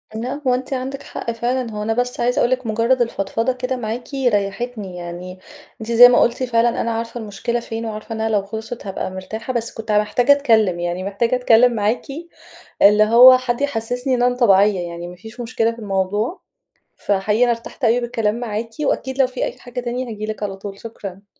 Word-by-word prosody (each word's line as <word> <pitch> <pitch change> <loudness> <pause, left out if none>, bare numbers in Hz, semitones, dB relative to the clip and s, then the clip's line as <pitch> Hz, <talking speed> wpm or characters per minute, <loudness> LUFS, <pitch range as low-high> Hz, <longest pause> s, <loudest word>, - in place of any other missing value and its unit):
لأ 250 +6 -4
هو 250 - +4
أنتِ 255 +2 -3
عندِك 265 +2 -4
حق 235 - -5
فعلًا، 240 +1 -2
هو 210 -1 -4
أنا 225 +1 0
بس 245 +1 -2
عايزة 245 +4 +1
أقول 240 - +2
لِك 255 -2 -1
مجرّد 230 +4 +1
الفضفضة 225 +2 -1
كده 255 +1 -3
معاكِ 240 +4 -5
ريّحتني 215 -4 -1
يعني، 175 +1 -8 0.4
أنتِ 220 +1 -5
زي 245 +1 +9
ما 245 - +4
قُلتِ 240 +2 +1
فعلًا 235 -1 +1
أنا 230 - -1
عارفة 230 +1 -4
المشكلة 225 +2 -3
فين 230 -1 -5
وعارفة 220 +1 -6
إنها 220 0 -1
لو 205 -3 +1
خلْصِت 220 +3 -7
هابقى 190 -1 -4
مرتاحة، 220 +6 -6
بس 235 -1 -2
كنت 225 -1 -5
محتاجة 210 +5 +3
أتكلّم 225 -10 +3
يعني، 175 +1 -3
محتاجة 205 +5 0
أتكلّم 245 0 +4
معاكِ. 215 +1 0 0.8
اللي 210 +1 +7
هو 245 +4 +8
حد 255 0 -2
يحسّسني 250 -1 -1
إن 245 - 0
أنا 245 0 +2
طبيعية، 205 -4 +4
يعني 170 0 -7
ما 180 - -10
فيش 220 +6 -13
مشكلة 230 -1 0
في 230 - -11
الموضوع. 205 - -2 0.6
فحقيقي 205 +3 0
أنا 245 - +2
ارتحت 230 +3 -7
أوي 235 +2 +3
بالكلام 225 -3 -1
معاكِ 225 -1 -4
وأكيد 265 -2 -1
لو 265 - +5
في 255 - -3
أي - - -5
حاجة 245 0 -6
تاني 245 -1 -4
هاجي 215 0 -5
لِك 215 -1 -6
على 195 -2 -3
طول. 195 0 -8
شكرًا. 200 -3 -9
230 Hz, 200 wpm, -20 LUFS, 210-245 Hz, 0.8 s, زي